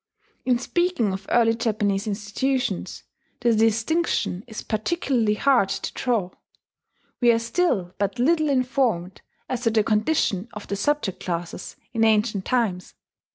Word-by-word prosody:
In 250 -1 +3
speaking 260 - 0
of 195 +1 -6
early 230 -1 +4
Japanese 215 -3 0
institutions, 225 +6 -2 0.4
the 240 -1 +3
distinction 225 - +1
is 220 -3 -7
particularly 225 -1 0
hard 245 -4 +3
to - - -3
draw: 225 -8 -1 0.9
we 240 -2 +5
are 230 - +3
still 230 - 0
but 200 +3 -1
little 310 +4 +2
informed 250 -9 0 0.3
as 255 -2 -3
to 235 - +2
the 220 -1 +2
condition 215 - +1
of 210 - -8
the 200 - -3
subject 220 -2 -1
classes 170 -1 -4 0.2
in 225 -2 +1
ancient 215 -2 +2
times. 215 -8 -1
225 Hz, 135 wpm, -24 LUFS, 205-255 Hz, 0.9 s, we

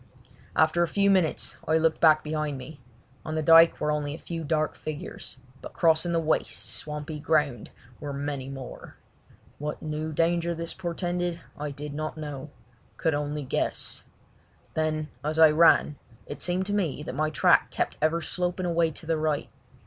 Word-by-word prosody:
After 160 +2 +3
a 170 - +3
few 200 +3 +3
minutes 185 -5 +1
I 160 +1 +4
looked 160 0 +1
back 155 -2 +6
behind 150 -2 -2
me. 135 +4 -10 0.4
On 155 - -4
the 155 - 0
dyke 165 +1 +7
were 150 - +1
only 150 -1 -2
a - - -8
few 165 -1 -5
dark 155 0 0
figures, 155 -3 -7 0.2
but - - -9
crossing 165 +1 +3
the 170 - +2
waste, 160 -1 -1
swampy 150 +1 -5
ground 150 -4 +1 0.3
were 145 - -5
many 140 -1 -4
more. 135 -2 -9 0.6
What 150 +1 -4
new 155 0 -3
danger 170 +2 +1
this 165 +1 -5
portended 175 -1 -2 0.2
I 150 0 -4
did 145 +1 -7
not 155 +2 -4
know—could 145 0 -5
only 145 0 -2
guess. 130 - -2 0.7
Then 155 -1 -1
as 155 +1 -1
I 160 -1 +8
ran 150 -2 +5 0.3
it - - -7
seemed 180 +1 0
to 205 - -2
me 170 -8 -1
that 150 - -5
my 155 +3 0
track 155 - +4
kept - - -2
ever 160 +2 +2
sloping 180 +1 -2
away 170 -1 +2
to 160 - -9
the 165 0 +1
right. 155 -2 -1
155 Hz, 170 wpm, -27 LUFS, 150-165 Hz, 0.7 s, I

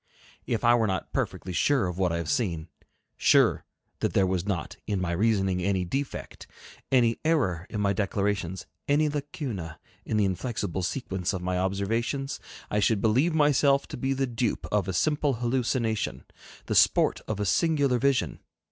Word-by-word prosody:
If 115 -1 -1
I 120 0 +6
were 115 -2 +3
not 95 -1 -3
perfectly 90 - -2
sure 135 +4 +2
of 90 0 -4
what 90 -2 +2
I 85 - -1
have 85 - -4
seen, 90 - -1 0.5
sure - - +4 0.3
that - - -1
there 95 - +4
was 95 0 -1
not 90 -7 -2
in 100 -2 0
my 90 -2 -1
reasoning 95 -1 +1
any 95 0 0
defect, 135 +10 -5 0.4
any 120 -3 +3
error 105 - +1
in 105 - -3
my 100 -1 +2
declarations, 100 -2 -1 0.2
any 150 +2 +3
lacuna 140 - -5 0.2
in 110 - -1
the 105 - +3
inflexible 95 -1 -2
sequence 95 -3 -2
of 90 -2 -4
my 90 0 -1
observations, 115 +8 -1 0.3
I 105 - +2
should 105 +1 +2
believe 130 +11 +2
myself 145 -2 +3
to - - -5
be 135 +2 0
the 135 0 0
dupe 120 -2 -2
of 105 -3 +1
a 95 - -2
simple 145 - +1
hallucination, 120 -2 -1 0.4
the - - -2
sport - - +4
of 110 -2 -3
a 105 - 0
singular 140 - +2
vision. 140 0 +1
105 Hz, 170 wpm, -27 LUFS, 95-135 Hz, 0.5 s, I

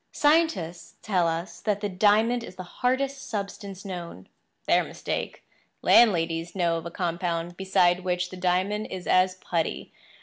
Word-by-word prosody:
Scientists 200 - +1
tell 185 -5 +2
us 165 +4 -3
that 210 -2 0
the 205 - -2
diamond 215 +5 +3
is 185 - -10
the 185 - -7
hardest 265 +7 -2
substance 200 -2 -5
known. 175 - -7 0.4
Their - - +4
mistake. - - -5 0.4
Landladies 170 -6 +4
know 170 -3 +1
of 165 +1 -6
a - - -5
compound 170 -1 -2
beside 185 -2 +3
which 180 0 -1
the - - -7
diamond 185 +4 0
is 185 -1 -6
as 185 0 +3
putty. 170 -3 -3
185 Hz, 145 wpm, -26 LUFS, 175-210 Hz, 0.4 s, Their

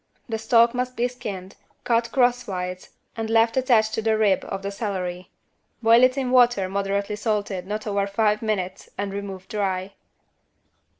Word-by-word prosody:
The 225 -2 -3
stalk 235 +1 +4
must 250 0 -3
be 240 +1 +2
skinned, 200 -6 -7 0.3
cut 230 -1 +1
crosswise 200 -8 0 0.3
and 225 -1 -4
left 225 0 +3
attached 235 -4 +3
to 220 - -1
the 220 0 +1
rib 205 -3 +2
of 195 - -5
the 200 - -3
celery. 185 -4 -4 0.5
Boil 230 +1 +6
it 255 +1 +4
in 260 -2 -1
water 245 -6 +4
moderately 200 +1 -1
salted 205 -4 -2
not 210 +1 -4
over 200 -2 0
five 210 +1 +1
minutes 190 -4 -3
and 200 -1 -3
remove 195 -2 -6
dry. 195 -2 -2
210 Hz, 160 wpm, -24 LUFS, 195-230 Hz, 0.5 s, Boil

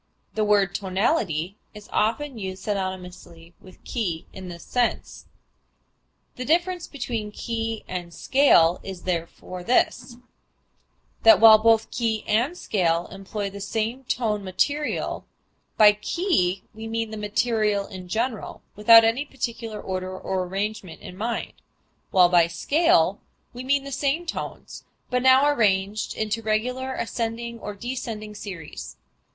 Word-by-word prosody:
The 215 - 0
word 205 -3 +3
tonality 190 - -1 0.2
is 210 0 -11
often 235 +4 0
used 190 -1 -6
synonymously 180 -4 -5
with 185 - -17
key 180 -10 -3
in 185 -1 -8
this 170 -1 -9
sense. 245 -1 -2 1.1
The 250 - -3
difference 350 +4 +1
between 235 -6 -4
key 225 0 -4
and 175 -2 -5
scale 175 - +4
is 190 -2 -8
therefore 180 +1 -4
this, 240 +1 +1 1.0
that 335 - +7
while 220 -1 +9
both 225 0 +3
key 225 -3 -1
and 240 +11 +1
scale 170 - 0
employ 195 +1 -5
the 200 +1 -8
same 225 +5 -2
tone 215 -5 -1
material, 285 +11 -1 0.5
by 210 -1 +8
key 210 - 0
we 220 +1 -8
mean 225 0 -2
the - - -5
material 210 -1 0
in 185 -2 -9
general, 225 +3 -3
without 225 +2 +8
any 225 +5 +2
particular 235 -6 -5
order 185 -1 -4
or 185 0 -2
arrangement 195 -1 -4
in 180 - -9
mind, 230 +5 -3 0.6
while 180 -3 +6
by 175 -1 +4
scale 195 - +2 0.3
we 245 +1 -7
mean 275 +1 +1
the 275 - -8
same 280 +5 0
tones, 340 - -6 0.3
but 250 0 +1
now 260 +2 +6
arranged 205 -6 +1
into 220 +1 -2
a - - -22
regular 250 +5 -1
ascending 235 0 -3
or 210 -1 -6
descending 220 -2 -5
series. 160 - -8
215 Hz, 135 wpm, -24 LUFS, 185-240 Hz, 1.1 s, while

